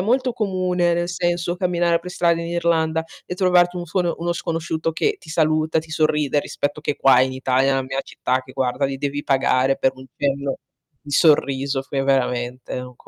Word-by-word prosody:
molto 250 +4 +1
comune 185 -5 0
nel 175 +1 -1
senso, 175 -1 -1
camminare 175 -2 +1
per 180 - -8
strada 170 -2 +2
in 170 - -5
Irlanda 165 -2 +1 0.2
e - - -5
trovarti 180 -1 +3
un 175 -1 -5
scono 175 0 0
uno 170 +1 -1
sconosciuto 165 -1 -2
che 425 - 0
ti 155 - -13
saluta, 155 0 +1
ti 160 0 -6
sorride, 150 -2 +1
rispetto 145 +2 -4
che 145 - -1
qua 130 -2 +5
in 130 0 0
Italia, 130 +1 +1
nella 135 -1 +1
mia 130 +1 -3
città, 130 +1 -2
che 130 0 -14
guarda 130 +1 -1
li 135 0 -2
devi 145 +1 -3
pagare 135 0 +2
per 130 - +2
un 130 0 -12
cenno 140 0 -1 0.4
di 145 - -12
sorriso, 140 -2 +3
fe 135 0 -3
veramente 125 -2 -1
è - - -3
un 125 0 -10
155 Hz, 195 wpm, -21 LUFS, 135-175 Hz, 0.4 s, qua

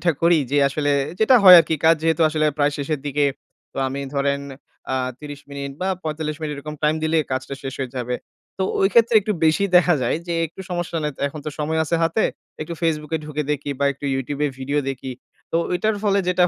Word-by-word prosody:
যেটা 170 +1 +2
করি 170 -1 +5
যে 145 - +1
আসলে, 145 +1 -1 0.3
যেটা 220 +4 +5
হয় 180 -2 +12
আরকি 160 0 -1
কাজ 165 - +7
যেহেতু 165 0 +2
আসলে 155 0 0
প্রায় 145 0 +2
শেষের 145 0 -3
দিকে। 145 +1 +1 0.5
তো - - -18
আমি 135 +1 -4
ধরেন 140 0 0 0.5
আ - - +1 0.2
৩০ 145 -1 -9
মিনিট 140 0 -5
বা 185 - -1
৪৫ 155 -1 -3
মিনিট, 150 -1 -3
এরকম 150 +2 -7
টাইম 150 0 +3
দিলে 160 0 +2
কাজটা 130 +1 -3
শেষ 135 -1 -5
হয়ে 130 -1 -4
যাবে। 125 0 -2 0.4
তো 190 - 0 0.2
ওই 195 - +4
ক্ষেত্রে 235 0 +4
একটু 210 +1 -2
বেশি 160 +5 +3
দেখা 175 0 +5
যায় 120 - +1
যে, 170 - -2
একটু 190 - -13
সমস্যা 175 -1 -3
নেই, 150 -1 -2
তো - - -14
এখন 150 +1 -9
তো - - -1
সময় 155 +1 -1
আছে 170 +2 0
হাতে। 165 +7 +1 0.4
একটু 165 +2 -4
Facebook 155 -2 -1
এ - - -4
ঢুকে 150 0 -3
দেখি 145 0 -4
বা 140 - +1
একটু 140 +1 -12
YouTube 140 +2 -3 0.2
ভিডিও 140 +2 -1
দেখি। 130 0 -6 0.4
তো - - +2 0.2
ঐটার 210 +4 0
ফলে 200 -1 +3
যেটা 180 0 +3
150 Hz, 220 wpm, -22 LUFS, 140-170 Hz, 0.5 s, হয়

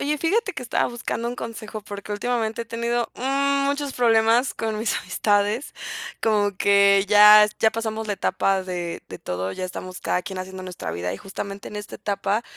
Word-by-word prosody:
Oye, 300 +2 0
fíjate 400 +7 0
que 275 - -6
estaba 240 - 0
buscando 235 -1 -4
un 240 - -4
consejo 225 -2 -6
porque, 205 0 -7
últimamente 225 +1 -1
he - - -11
tenido 235 +1 -1 0.6
muchos 285 0 -1
problemas 230 +1 +3
con 220 -1 -3
mis 220 0 0
amistades, 205 +6 0 0.5
como 205 -3 +2
que 200 0 +5
ya 210 0 +9
es 210 - -2
ya 220 - +4
pasamos 220 -1 -3
la 210 - -1
etapa 195 -1 0
de 175 -2 -4
de 90 - -8
todo, 90 +1 -3
ya 185 - -4
estamos 185 0 -7
cada 180 - 0
quien 190 0 -6
haciendo 185 0 -7
nuestra 180 - -6
vida 90 +1 -3
y - - -5
justamente 195 0 -7
en - - -11
esta 210 0 -7
etapa, 200 +2 -1
210 Hz, 185 wpm, -23 LUFS, 195-230 Hz, 0.6 s, ya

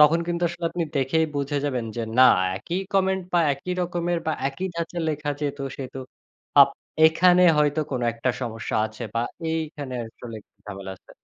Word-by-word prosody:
তখন 155 +3 +6
কিন্তু 175 0 -2
আসলে 170 0 -7
আপনি 175 -2 -2
দেখেই 140 +5 +2
বুঝে 140 +1 -1
যাবেন 125 -5 -1
যে, 115 - -1 0.2
না 130 - +9 0.3
একই 170 - -3
কমেন্ট 190 -1 +2
বা 175 - +4
একই 160 +7 -4
রকমের 175 -1 -1
বা 160 - +1 0.2
একই 160 +8 -4
ধাঁচে 170 +1 -3
লেখা 150 -1 -2
যেহেতু, 145 -1 -3
সেহেতু 135 -1 -7 0.6
আব 140 - +9 0.4
এখানে 180 +3 +5 0.2
হয়তো 150 +1 +2
কোনো 125 -2 -1
একটা 120 +2 -1
সমস্যা 115 -2 -3
আছে 110 +2 -10
বা 115 - +1 0.3
এইখানে 150 -5 -4
আসলে 115 -1 -10 0.3
ঝামেলা 100 -2 -7
আছে। - - -23
150 Hz, 170 wpm, -24 LUFS, 130-170 Hz, 0.6 s, না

